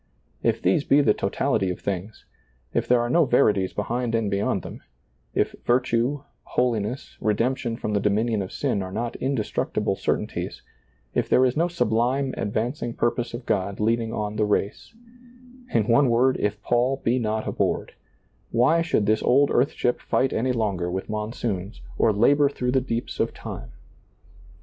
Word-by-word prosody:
If - - 0
these 95 +11 +3
be 145 +1 +4
the 110 -7 +4
totality 100 0 0
of 90 - -4
things, 100 +2 -5 0.5
if - - 0
there 125 -1 +4
are 120 - -1
no 165 +7 +4
verities 105 -7 +3
behind 115 +3 -2
and 110 -3 0
be 100 - +1
yond 100 - 0
them, - - -9 0.5
if - - +2
virtue, 125 +3 +1 0.2
holiness, 120 0 -2
redemption 115 +2 0
from 105 - -3
the 100 - +2
dominion 105 +2 +1
of 95 - -5
sin 100 - -1
are 95 -1 -5
not 115 +4 -3
indestructible 130 -5 -1
certain - - 0
ties, - - -6 0.5
if - - 0
there 130 - +5
is 125 - +1
no 170 +3 +2
sublime 130 -4 0
advancing 120 +3 -2
purpose 120 0 -1
of 120 0 -8
God 100 -2 -1
leading 115 +1 +1
on 105 -1 -3
the 105 - +2
race 105 - -1 0.4
— 245 - -22 0.3
in 110 -2 +2
one 125 +3 +4
word, 125 +3 +3
if 105 0 -1
Paul 125 +3 +1
be 120 +3 +2
not 110 -1 -2
aboard - - -1 0.3
— - - -40
why 130 +8 +3
should 165 -11 +1
this 110 +1 +2
old 140 +3 +4
earth 125 +3 +2
ship 125 - 0
fight 130 - +1
any 130 +3 +1
longer 100 -7 -1
with 95 +4 -4
monsoons 105 -2 -3 0.2
or 110 - +4
labor 140 +7 +4
through 125 -3 -2
the 130 0 +2
deeps 120 -2 -4
of - - 0
time - - -7
115 Hz, 175 wpm, -24 LUFS, 105-125 Hz, 0.5 s, there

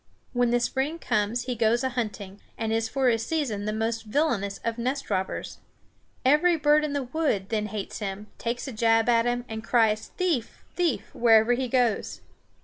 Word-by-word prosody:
When 245 -1 +2
the 240 +1 +3
spring 265 +6 -1
comes 215 -4 0
he 250 0 -2
goes 235 +1 +2
a 260 - +1
hunting, 210 -5 -5 0.2
and 225 -1 -1
is 225 0 0
for 265 +2 +1
a 225 -1 +2
season 225 -5 -2
the 215 - -1
most 225 +1 -2
villainous 210 -6 0
of 230 0 -2
nest 260 +4 -2
robbers. 190 0 -3 0.7
Every 300 +6 +5
bird 300 0 +4
in 300 -1 -2
the 285 -1 -1
woods 250 -8 -1
then 215 -2 -1
hates 210 -2 -5
him, 200 0 -4
takes 240 +3 -3
a - - -4
jab 225 0 +2
at 230 -1 +4
him, 245 0 -1
and 220 -1 -6
cries 220 -3 +2
thief, 330 - -1
thief! 320 - -1
wherever 225 0 +5
he 255 +1 -1
goes. 240 -4 0
235 Hz, 185 wpm, -26 LUFS, 220-260 Hz, 0.7 s, Every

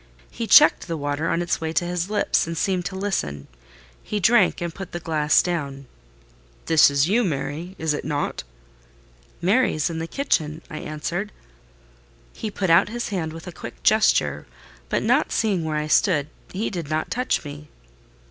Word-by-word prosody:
He - - -4
checked - - +6
the 165 - -3
water 145 +2 -2
on 170 - 0
its 175 - -1
way 160 0 -2
to 175 - +1
his 175 +1 -2
lips, 205 -5 +1
and 165 0 -4
seemed 185 0 0
to 190 - -4
listen: 75 - -3 0.5
he 210 - -3
drank, 205 -1 +4
and 170 -1 -4
put 195 -1 -9
the 175 - -3
glass 155 -2 +2
down. 140 -6 -3 0.8
"This 160 -3 +6
is 140 +1 +2
you, 230 +6 +2
Mary, 160 +2 -3
is 160 -2 0
it 150 - -4
not?" 145 -1 -2 1.0
"Mary 230 +8 +3
is 155 +2 -1
in 160 - -4
the 165 - -4
kitchen," 160 - -1
I 155 - -5
answered. 170 +7 -4 1.0
He 220 - -5
put 195 -4 -1
out 170 +5 +5
his 240 +2 -4
hand 175 -6 -2
with 165 +1 -10
a 180 - -7
quick - - -10
gesture, - - +3 0.4
but - - 0
not - - +2
seeing 200 -6 0
where 155 -1 -1
I 150 - -1
stood, 155 -2 +2 0.2
he 200 +4 -3
did 170 -6 -5
not 155 0 -2
touch 250 -8 -1
me. 145 +1 -9
165 Hz, 180 wpm, -23 LUFS, 150-190 Hz, 1.0 s, checked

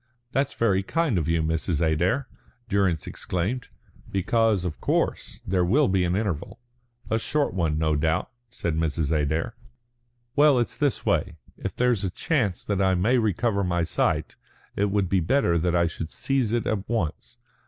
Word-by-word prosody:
"That's 135 +1 0
very 100 -5 +2
kind 145 - 0
of 80 - -2
you, 80 -1 +1
Mrs. 80 0 0
Adair," 85 - +1 0.4
Durrance 95 -6 +1
exclaimed; 100 +8 -3 0.4
"because, 105 0 +2
of 80 -4 -4
course, - - -1
there 90 -1 +1
will 130 +11 +3
be 95 -1 +2
an 90 +1 0
interval." 105 +1 -3 0.5
"A 110 - +2
short 145 -1 0
one, 80 -4 0
no 80 -1 +1
doubt," 80 +2 0 0.2
said 85 -6 -3
Mrs. 80 -1 0
Adair. 80 +6 0 0.8
"Well, 145 -2 +6
it's 120 - 0
this 145 -3 0
way. 85 +1 +1 0.2
If - - -5
there's 125 -5 +2
a 95 - 0
chance 110 - -1
that 100 -2 0
I 95 -1 +3
may 115 +8 +3
recover 105 -1 +1
my 85 -2 0
sight, - - 0 0.4
it 100 - +2
would 100 -1 +1
be 95 +1 +2
better 85 -2 +2
that 90 +1 +1
I 85 0 +3
should 80 -1 -4
seize 135 -5 0
it 120 0 0
at 105 -2 -2
once. 115 +2 -3
95 Hz, 170 wpm, -25 LUFS, 85-115 Hz, 0.8 s, Well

